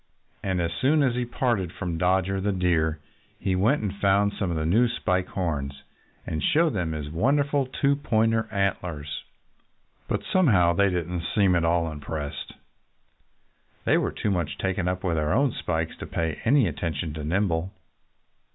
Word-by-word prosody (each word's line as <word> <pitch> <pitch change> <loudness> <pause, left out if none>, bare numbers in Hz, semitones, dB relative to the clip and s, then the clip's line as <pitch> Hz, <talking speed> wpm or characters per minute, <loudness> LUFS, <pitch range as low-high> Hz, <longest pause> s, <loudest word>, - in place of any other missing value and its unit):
And 95 -2 -1
as 85 -1 0
soon 145 - +3
as 130 -3 +2
he 125 0 -1
parted 120 -7 -1
from 85 -2 -4
Dodger 95 +2 +1
the 100 +1 +1
Deer 85 -4 +1 0.4
he 95 - 0
went 110 +8 +2
and 100 -1 -2
found 100 +1 +2
some 95 - -2
of 85 - -1
the 80 - -1
new 110 +9 +4
Spike 90 -6 -1
Horns 70 -7 -3 0.4
and 80 - -3
showed 160 0 +3
them 85 -5 -1
his 75 -1 -5
wonderful 140 - +1
two 140 +2 +1
point 115 -5 +2 0.2
antlers. 90 -7 -2 0.8
But - - -1
somehow 100 - +4
they 100 +2 +3
didn't 90 -1 -2
seem 100 -3 +4
at 85 - +2
all 85 -1 +1
impressed. 75 0 -5 1.3
They - - +4
were - - -1
too 105 - -2
much 85 -6 -1
taken 95 -1 -1
up 90 0 -2
with 85 -4 0
their 75 -1 +1
own 135 +2 +3
spikes 80 -5 -2
to - - -7
pay 80 -2 -2
any 130 -1 +4
attention 80 +1 -3
to 75 -1 -6
Nimble. 85 +1 0
90 Hz, 170 wpm, -26 LUFS, 80-110 Hz, 1.3 s, new